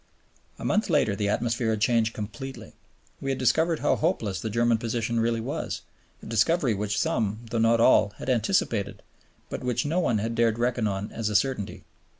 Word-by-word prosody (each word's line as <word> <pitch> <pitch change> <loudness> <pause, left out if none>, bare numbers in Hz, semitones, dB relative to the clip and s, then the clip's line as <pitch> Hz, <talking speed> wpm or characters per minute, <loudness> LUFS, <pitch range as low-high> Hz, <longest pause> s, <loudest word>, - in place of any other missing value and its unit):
A - - -7
month 215 -1 +1
later 145 -10 +2
the 100 0 -1
atmosphere 115 +1 0
had 110 -1 0
changed 115 0 +2
completely. 110 +6 -7 0.5
We 135 - -3
had 135 - 0
discovered 160 +7 +2
how 145 - +3
hopeless 105 -4 -1
the 110 - -3
German 115 +1 +2
position 115 0 -1
really 115 0 +1
was, - - -4 0.4
a - - -9
discovery 115 +4 +2
which 105 +2 -1
some, 110 -1 0
though 115 - 0
not 115 +1 +4
all, 110 -3 +5
had - - -8
anticipated, 115 - 0 0.5
but - - -4
which 125 0 0
no 160 +5 +1
one 120 -10 +1
had 115 +3 -2
dared 115 -1 +2
reckon 120 -2 0
on 100 0 -3
as 110 -2 -2
a 105 - -3
certainty. 130 -4 0
115 Hz, 185 wpm, -26 LUFS, 110-125 Hz, 0.5 s, all